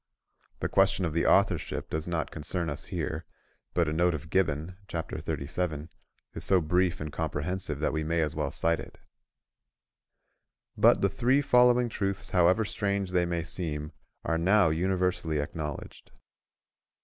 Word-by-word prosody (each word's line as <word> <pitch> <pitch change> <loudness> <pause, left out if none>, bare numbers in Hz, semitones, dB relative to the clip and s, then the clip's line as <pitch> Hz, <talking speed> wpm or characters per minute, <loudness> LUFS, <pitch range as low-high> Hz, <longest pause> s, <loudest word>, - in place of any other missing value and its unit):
The - - +1
question 95 -1 +3
of 80 - -2
the 85 - +1
authorship - - +2
does 80 +1 -2
not 85 -2 -2
concern 85 +1 -3
us 75 - -5
here, - - -3 0.5
but 85 -2 +2
a 75 - -1
note 85 +1 +2
of 75 +1 -8
Gibbon 85 -1 0
(chapter 85 -4 -4
37) 75 +1 -3 0.4
is - - -3
so 95 - +4
brief 90 +2 +1
and 75 -1 -5
comprehensive 80 +1 -2
that - - 0
we 80 0 -1
may 85 +2 0
as 75 -1 0
well 75 -1 -1
cite 85 0 +1 2.0
it:—"But - - +6
the 100 - +4
three 125 +8 +2
following 125 -2 +5
truths, 100 -4 -3
however 90 +4 +4
strange 100 -2 -1
they 90 -1 +2
may 85 -1 -1
seem, 75 -3 -4 0.3
are 80 0 0
now 95 +1 +4
universally 90 -2 0
acknowledged. 75 0 -6
85 Hz, 150 wpm, -28 LUFS, 80-95 Hz, 2.0 s, it:—"But